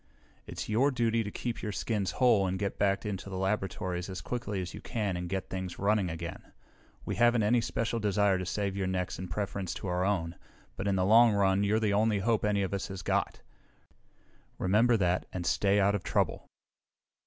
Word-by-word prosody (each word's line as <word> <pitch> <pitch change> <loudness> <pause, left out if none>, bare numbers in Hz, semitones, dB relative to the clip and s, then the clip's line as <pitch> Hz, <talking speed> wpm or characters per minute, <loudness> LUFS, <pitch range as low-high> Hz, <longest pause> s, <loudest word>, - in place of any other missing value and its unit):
"It's - - -6
your 120 +6 +3
duty 115 -3 +1
to 105 - -5
keep 120 +3 -4
your 105 - -3
skins 105 -1 -1
whole 115 -7 +4
and 95 +1 -1
get 100 +1 -3
back 100 0 +1
into 100 -1 -4
the 95 - -5
laboratories 95 -2 -2
as 95 -2 -5
quickly 105 +1 -4
as 90 -1 -5
you - - -8
can 105 -6 -2
and 90 0 -4
get 95 0 -3
things 95 -2 -4
running 100 -2 +1
again! 85 +1 -7 0.5
We - - -3
haven't 120 -1 +4
any 120 +3 +3
special 115 0 -2
desire 100 -2 +2
to 90 - -3
save 100 0 -2
your 95 -1 -1
necks 95 0 -2
in 90 - -5
preference 95 0 -3
to - - -7
our 90 +1 0
own, 90 -4 -1 0.4
but 100 - -3
in 100 - +2
the 90 -1 +1
long 115 +2 +6
run 100 -1 +2
you're 105 +2 +2
the 105 -2 +1
only 105 +1 +2
hope 110 +2 +1
any 105 -1 +1
of 95 - -3
us 100 - -2
has 95 -2 -7
got. - - -1 1.1
Remember 115 +5 +3
that, 90 -2 0
and 90 -2 -4
stay 100 +2 +2
out 100 +1 +3
of 100 - -1
trouble!" - - -1
100 Hz, 205 wpm, -30 LUFS, 95-110 Hz, 1.1 s, long